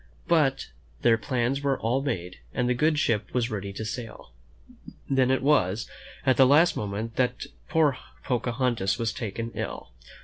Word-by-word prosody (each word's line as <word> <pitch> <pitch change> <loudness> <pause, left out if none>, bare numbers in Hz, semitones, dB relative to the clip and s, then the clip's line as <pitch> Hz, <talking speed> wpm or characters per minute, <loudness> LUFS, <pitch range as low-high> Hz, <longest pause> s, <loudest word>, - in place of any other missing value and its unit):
But 145 - +2 0.3
their 115 -1 +4
plans 130 +3 -1
were 140 -2 +1
all 120 +4 0
made, 90 -10 -4 0.2
and 125 -1 +1
the 125 - +3
good 150 +5 +2
ship 115 -8 0
was 120 -1 +1
ready 100 -2 -4
to 110 - -5
sail. 115 0 -7 0.8
Then 130 -2 +2
it 130 0 +1
was, 115 -7 +2 0.4
at 130 -1 +3
the 130 - +7
last 155 +6 +5
moment, 105 +3 -4
that 125 -1 0 0.2
poor 150 -5 +2 0.2
Pocahontas 120 -4 0
was 115 -2 -1
taken 115 +1 -4
ill. - - -5
125 Hz, 160 wpm, -26 LUFS, 115-135 Hz, 0.8 s, the